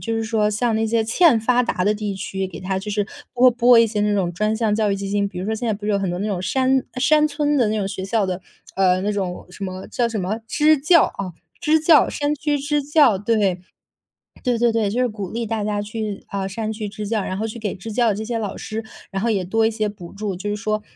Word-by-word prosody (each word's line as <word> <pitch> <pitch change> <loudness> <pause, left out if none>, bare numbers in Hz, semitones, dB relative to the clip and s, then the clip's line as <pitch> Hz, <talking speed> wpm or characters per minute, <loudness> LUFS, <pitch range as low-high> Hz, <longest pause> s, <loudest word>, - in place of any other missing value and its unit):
就 230 - -3
是 225 - -1
说 220 -2 +1
像 225 +2 0
那 220 0 +1
些 225 0 +1
欠 245 +2 +4
发 245 +3 +2
达 185 -6 -1
的 210 - +3
地 205 -2 -4
区， 190 0 -4
给 165 - -9
它 190 +1 -2
就 210 +1 -6
是 205 0 0 0.3
拨 255 0 +6
拨 240 0 +5
一 230 - +6
些 210 -1 -2
那 210 0 +2
种 185 -4 0
专 215 +4 0
项 220 -2 +1
教 215 -1 +1
育 195 - 0
基 195 0 -5
金， 200 0 0
比 180 - -8
如 180 - -3
说 220 - 0
现 235 +1 -3
在 - - +2
不 205 +1 -5
是 210 - +1
有 - - +3
很 190 -3 -1
多 175 - -3
那 205 - -2
种 190 -4 -2
山 260 +4 +1 0.2
山 305 +3 +4
村 295 0 0
的 240 -5 +3
那 215 - 0
种 195 - -1
学 195 -1 -5
校 215 0 +1
的 185 0 -3 0.3
呃， 185 -1 +3
那 205 - 0
种 185 -3 -4
什 200 - -11
么 185 0 -6
叫 240 - 0
什 225 -2 -3
么 195 +5 -2
支 300 +3 +3
教， 330 +3 +5
啊， 185 -3 -5 0.3
支 315 0 +3
教 315 -1 +5
山 290 +1 -1
区 295 0 -1
支 290 +1 0
教， 285 -7 +4
对。 205 -4 +1 0.8
对 245 -3 +1
对 235 0 +3
对， 225 -2 +1
就 245 +5 0
是 250 - +1
鼓 205 -4 -6
励 230 -1 -3
大 220 -2 -2
家 205 0 -1
去， 210 -1 -5
啊， 195 -1 -3
山 220 +2 -3
区 215 -1 -4
支 210 0 -6
教， 220 -1 0
然 185 - -3
后 220 - -2
去 225 - -7
给 215 -3 -3
支 215 +4 -8
教 235 +1 +2
的 200 - 0
这 215 - -4
些 230 +1 -3
老 210 -3 -3
师， 220 0 -5 0.2
然 195 -1 -3
后 235 - +1
也 195 -3 0
多 220 +5 +1
一 225 - +2
些 215 -1 -1
补 185 -4 -11
助， 200 -2 -4
就 195 +3 -6
是 205 - -1
说 215 0 -2
215 Hz, 300 characters per minute, -21 LUFS, 200-235 Hz, 0.8 s, 拨